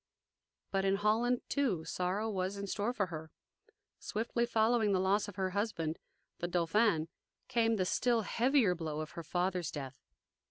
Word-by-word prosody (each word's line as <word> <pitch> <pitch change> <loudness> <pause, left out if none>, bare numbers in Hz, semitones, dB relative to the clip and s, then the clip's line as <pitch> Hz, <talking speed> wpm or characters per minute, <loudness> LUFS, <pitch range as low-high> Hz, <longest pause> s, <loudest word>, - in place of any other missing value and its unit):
But 195 -1 +1
in 195 0 +3
Holland, 225 +4 +2
too, 220 - 0
sorrow 185 +6 -1
was 195 -1 -2
in 200 - -4
store 205 +4 -1
for 215 -5 0
her. 160 0 -6 0.7
Swiftly 235 +2 -1
following 220 -2 +3
the 185 - +3
loss 195 +3 +2
of 205 - -8
her 190 -1 -1
husband, 180 -6 -2 0.4
the 175 - -1
Dauphin, 175 0 +2 0.4
came 230 -3 +2
the 185 -3 +1
still 235 +4 +2
heavier 240 -3 +3
blow 155 -3 -4
of 155 - -6
her 170 - -6
father's 180 0 -1
death. 135 -3 -7
195 Hz, 160 wpm, -33 LUFS, 175-225 Hz, 0.7 s, in